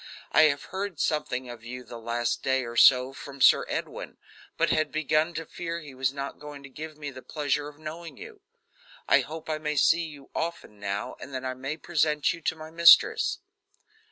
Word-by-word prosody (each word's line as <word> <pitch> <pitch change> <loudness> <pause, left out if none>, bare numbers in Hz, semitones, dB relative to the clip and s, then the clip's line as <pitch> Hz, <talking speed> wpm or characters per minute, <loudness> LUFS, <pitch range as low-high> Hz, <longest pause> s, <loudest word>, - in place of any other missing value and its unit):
"I 155 - +7
have 140 -2 +1
heard 190 -3 -4
something 130 -5 -1
of 120 -2 -9
you 125 +2 -7
the 120 -1 -9
last 120 +1 -1
day 130 -1 +1
or 120 0 -7
so 130 +1 +6
from 140 0 -10
Sir - - +6
Edwin, - - -5 0.4
but - - +2
had 155 - +1
begun 155 +2 +1
to 165 - -4
fear 170 +1 -5
he 145 -4 -11
was 130 0 0
not 140 0 -6
going 145 -1 -9
to 140 - -10
give 155 +2 -8
me 145 -2 -6
the 130 -1 -10
pleasure 145 0 -2
of 150 -1 -12
knowing 160 +2 -8
you. 430 -1 -11 0.7
I - - +6
hope 160 0 -6
I 155 -1 -2
may 150 -1 -2
see 165 +4 +4
you 145 -3 -13
often 165 -11 -4
now, 100 0 -4
and 140 - -9
that 130 0 -4
I 130 - -2
may 135 +4 -5
present 155 -3 +1
you 170 - -10
to 160 - -1
my 155 0 -10
mistress." 170 +1 +6
150 Hz, 205 wpm, -27 LUFS, 130-160 Hz, 0.7 s, I